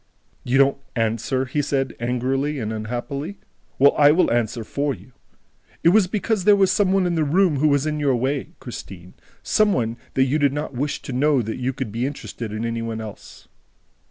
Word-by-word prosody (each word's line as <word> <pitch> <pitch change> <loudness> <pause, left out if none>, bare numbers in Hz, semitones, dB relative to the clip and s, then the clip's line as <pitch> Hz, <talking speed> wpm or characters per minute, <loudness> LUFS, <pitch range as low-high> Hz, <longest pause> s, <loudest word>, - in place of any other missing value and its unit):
"You 125 +2 +1
don't 140 0 +4 0.2
answer!" 115 +3 0
he 140 +3 -1
said 135 -2 -1
angrily 130 +5 -1
and 110 -3 -3
unhappily. 125 - -4 0.4
"Well, 140 +1 +6
I 145 -1 +6
will 175 +4 +3
answer 115 0 0
for 140 +4 -2
you. 100 +6 -17 0.7
It 170 - +6
was 200 0 +4
because 210 0 -1
there 205 +1 +6
was 195 -2 +3
some 190 0 +2
one 195 -1 +2
in 175 - 0
the 160 -2 +1
room 165 +1 +2
who 150 +3 +3
was 140 -1 +2
in 150 -1 -1
your 140 -3 +2
way, 140 +6 -2
Christine, 95 -7 -9 0.3
some 215 -1 +3
one 115 -1 -1 0.2
that 130 - +4
you 135 +4 +1
did 140 -2 +2
not 150 0 -4
wish 140 +4 -3
to 135 - -6
know 140 0 +2
that 110 +3 -4
you 130 +1 -1
could 130 -4 -5
be 120 +4 -1
interested 120 -5 -6
in 110 +2 -3
any 115 0 -2
one 115 -1 -4
else!" 110 -2 -10
135 Hz, 205 wpm, -22 LUFS, 120-150 Hz, 0.7 s, Well